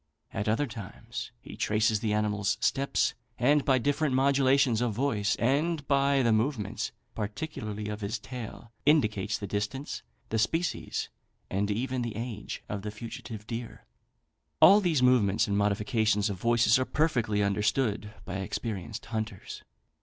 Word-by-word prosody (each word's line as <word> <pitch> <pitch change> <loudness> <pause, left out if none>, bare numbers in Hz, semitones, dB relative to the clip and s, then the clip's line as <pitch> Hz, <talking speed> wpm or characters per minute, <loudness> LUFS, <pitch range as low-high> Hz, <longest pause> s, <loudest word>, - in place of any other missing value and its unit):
At 105 -1 -1
other 115 +7 +2
times 110 -6 -7
he - - -10
traces 110 0 +2
the 110 -1 -1
animal's 105 -1 +1
steps, 140 0 +1 0.2
and 145 +4 +4
by 135 -2 +4
different 145 +2 +1
modulations 135 -3 +3
of 120 -3 +1
voice, 105 -6 +1
and 145 +5 +1
by 140 -1 +3
the 115 - +3
movements, 110 -2 0 0.2
particularly 105 -1 -4
of 105 0 -5
his 105 +3 -2
tail, 115 0 -8
indicates 110 -8 +2
the 100 - -5
distance, 105 +8 -3 0.3
the 110 - 0
species, 165 +10 -1 0.4
and 100 +2 0
even 125 +4 -1
the 120 -3 -3
age 115 -2 -5
of 100 -1 -4
the 105 - -4
fugitive 110 0 -8
deer. 115 0 -6 0.7
All 200 +2 +8
these 160 -9 +2
movements 115 -6 +4
and 100 - 0
modifications 105 0 +1
of 95 - -5
voice 115 +3 +4
are 130 - +1
perfectly 120 -10 +1
understood 105 +2 0
by 95 0 -4
experienced 100 +2 -4
hunters. 110 -4 -5
115 Hz, 145 wpm, -29 LUFS, 105-130 Hz, 0.7 s, All